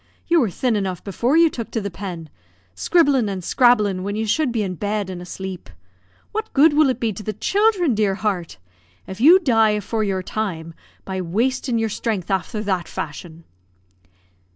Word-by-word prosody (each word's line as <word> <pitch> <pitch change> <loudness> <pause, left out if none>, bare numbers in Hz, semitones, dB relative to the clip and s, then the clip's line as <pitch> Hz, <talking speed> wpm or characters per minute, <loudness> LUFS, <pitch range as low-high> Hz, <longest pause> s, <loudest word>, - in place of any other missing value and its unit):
You 340 0 +4
were 230 - +1
thin 240 +5 -1
enough 190 -3 -3
before 235 - 0
you 335 0 +6
took 240 -7 -5
to 225 - -2
the 200 -2 -4
pen; 175 -4 -7 0.5
scribblin' 275 - +2
an' 190 -2 -4
scrabblin' 210 -5 +3
when 200 +2 -3
you 220 +1 -1
should 265 +5 +1
be 225 -3 -1
in 185 -2 -3
bed 205 +1 -3
an' 180 -1 -7
asleep. 185 +1 -7 0.6
What 440 +1 -4
good 295 +2 +5
will 300 -1 +4
it 255 -2 -1
be 225 -3 -1
to 215 - -8
the 215 0 -4
childhren, 390 - +2
dear 205 -3 +1
heart! 190 - -3 0.5
If 190 +3 -8
you 330 +8 +8
die 225 - +3
afore 215 +1 -2
your 190 -2 -1
time, 170 -6 -4 0.3
by 190 -1 -3
wastin' 235 +7 -1
your 225 -1 0
strength 205 -3 -3
afther 205 +3 -2
that 190 -4 -1
fashion?" 160 +3 -7
215 Hz, 180 wpm, -21 LUFS, 190-250 Hz, 0.6 s, you